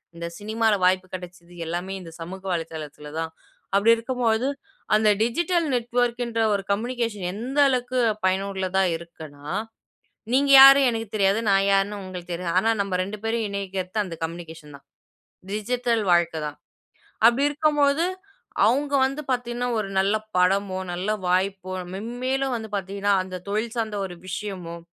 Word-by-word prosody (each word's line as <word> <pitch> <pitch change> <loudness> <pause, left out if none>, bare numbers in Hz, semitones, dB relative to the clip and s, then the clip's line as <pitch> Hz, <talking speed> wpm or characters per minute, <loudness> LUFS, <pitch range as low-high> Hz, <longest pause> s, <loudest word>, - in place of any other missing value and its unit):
இந்த 170 0 -6
சினிமால 220 +1 +1
வாய்ப்பு 185 0 +3
கெடச்சது 180 -1 -9
எல்லாமே 175 +3 -3
இந்த 165 -2 -10
சமூக 185 +3 -7
வலைத்தளத்தில 155 -3 -6
தான். 165 0 -3 0.5
அப்டி 215 +3 +5
இருக்கும் 250 +2 -4
பொழுது 230 +4 +2 0.5
அந்த 215 0 +4
டிஜிட்டல் 335 +9 +1
நெட்வொர்க்ன்ற 240 -1 0
ஒரு 200 - 0
கம்யூனிகேஷன் 230 -2 -2
எந்த 245 +7 -5
அளவுக்கு 255 -1 -1 0.3
பயனுள்ளதா 190 0 0
இருக்குன்னா, 155 -4 -12 0.9
நீங்க 275 +2 +3
யாரு 275 +1 +10
எனக்குத் 225 -2 -5
தெரியாது. 200 0 +3
நான் 195 0 +4
யார்ன்னு 200 +1 +2
உங்களுக்கு 180 -2 -8
தெரியாது. 170 0 -3
ஆனா 225 - +2
நம்ப 195 -2 -1
2 200 +3 -5
பேரையும் 225 -1 0
இணைக்கிறது 195 0 -3
அந்த 170 -4 -7
கம்யூனிகேஷன் 160 -3 -7
தான். 140 - -21 0.7
டிஜிட்டல் 230 +2 0
வாழ்க்க 170 -2 +2
தான். 150 0 -7 0.7
அப்டி 240 +4 +3
இருக்கும் 300 0 +1
பொழுது, 285 +4 +3 0.6
அவுங்க 280 +6 +1
வந்து 275 +3 -3
பாத்தீங்கன்னா 245 0 -1
ஒரு 210 - -2
நல்ல 195 +2 +2 0.2
படமோ, 190 +1 +2 0.2
நல்ல 180 +4 -3 0.2
வாய்ப்போ 185 +1 0 0.2
மெம்மேலும் 255 +5 -2
வந்து 220 -2 -5
பாத்தீங்கன்னா 200 +1 0
அந்த 185 -1 -7
தொழில் 220 +3 -2
சார்ந்த 220 -3 -2
ஒரு 180 -2 -8
விஷயமும், 185 -4 -6
200 Hz, 140 wpm, -24 LUFS, 180-235 Hz, 0.9 s, யாரு